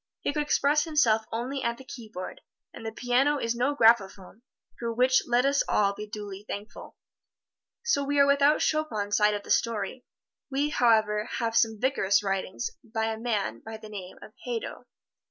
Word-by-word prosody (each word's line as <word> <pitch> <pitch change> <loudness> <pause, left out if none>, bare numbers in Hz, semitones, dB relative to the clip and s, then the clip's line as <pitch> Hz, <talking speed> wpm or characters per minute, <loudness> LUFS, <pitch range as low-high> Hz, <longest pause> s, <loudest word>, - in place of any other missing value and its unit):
He - - -1
could 300 - 0
express 295 0 +2
himself 240 -9 +2
only 255 +4 -3
at 235 -2 -1
the 265 - -12
keyboard, 220 -8 -8 0.3
and - - -10
the 225 - -4
piano 250 +6 +2
is 230 -4 -1
no 250 +5 0
graphophone, 220 -4 +2 0.4
for 235 -1 -2
which 255 +3 +3
let 245 +1 +3
us 280 0 +3
all 200 -1 +2
be 210 +1 -7
duly 205 -1 -7
thankful. 205 +2 -8 0.9
So 285 -12 +1
we 285 +1 -1
are 280 - +7
without 280 +1 +4
Chopin's 220 -10 0
side 210 0 +3
of 205 - -5
the - - -6
story. 230 +2 0 0.5
We, 280 +2 0
however, 220 -5 +3
have 230 -2 -1
some 225 -2 +2
vigorous 210 -6 +2
writing 195 - -2 0.2
by 225 0 -2
a 220 - -7
man 225 -4 -2
by 220 0 -7
the 215 0 -12
name 190 -3 -8
of 215 - -13
Hadow. 240 -2 -4
Mr. - - -23
230 Hz, 180 wpm, -27 LUFS, 210-270 Hz, 0.9 s, are